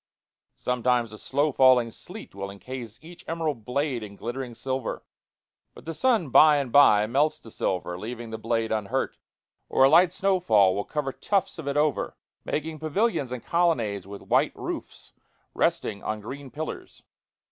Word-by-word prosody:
Sometimes 125 -2 0
a 110 - -9
slow 145 +3 0
falling 130 -3 +5
sleet 200 - -9
will 100 0 -5
incase 115 +3 -8
each 170 +2 -12
emerald 160 -8 -2
blade 135 -1 -1
in 100 -1 -8
glittering 120 +2 -5
silver; 130 +1 -4 0.7
but - - -14
the 165 - -4
sun 225 - +2
by 150 +3 +7
and 135 -4 -2
by 105 -7 +6
melts 140 +7 +1
the 115 - -14
silver, 90 -3 -2
leaving 115 +2 -6
the 110 - -5
blade 115 0 -1
unhurt. 105 -3 -1 0.5
Or - - +4
a 135 - +7
light 170 +3 +6
snow 190 0 +1
fall 105 - +4
will 100 - -2
cover 150 -3 -2
tufts 195 -4 -1
of 150 - -7
it 140 +1 -1
over, 150 0 0 0.3
making 155 +1 -3
pavilions 160 - 0
and 125 -2 -6
colonnades 115 - +1
with 100 0 -9
white - - +2
roofs - - -7 0.4
resting 100 -2 0
on 110 0 -3
green 135 +6 -8
pillars. 155 +4 -7
130 Hz, 165 wpm, -26 LUFS, 110-155 Hz, 0.7 s, by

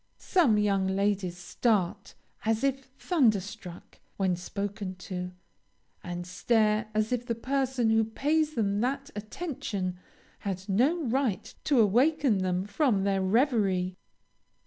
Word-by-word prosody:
Some 305 - +3
young 200 -2 +2
ladies 190 -2 0
start, 185 +1 -1 0.3
as 225 +2 0
if 270 -1 0
thunderstruck, 205 - -1 0.2
when 190 -2 +1
spoken 200 +1 -4
to, 180 0 -5 0.7
and 175 0 -5
stare 215 +3 +1
as 215 +1 +1
if 245 -1 0
the 230 - 0
person 260 -1 0
who 225 0 +4
pays 300 +7 0
them 205 -3 +1
that 275 +3 -2
attention, 210 - -4 0.4
had 190 -1 -4
no 270 - +2
right 250 -5 -1
to 280 -5 +3
awaken 245 +2 +3
them 185 0 0
from 205 -2 +1
their 195 -1 +1
reverie. 195 -4 +2
215 Hz, 125 wpm, -28 LUFS, 190-255 Hz, 0.7 s, who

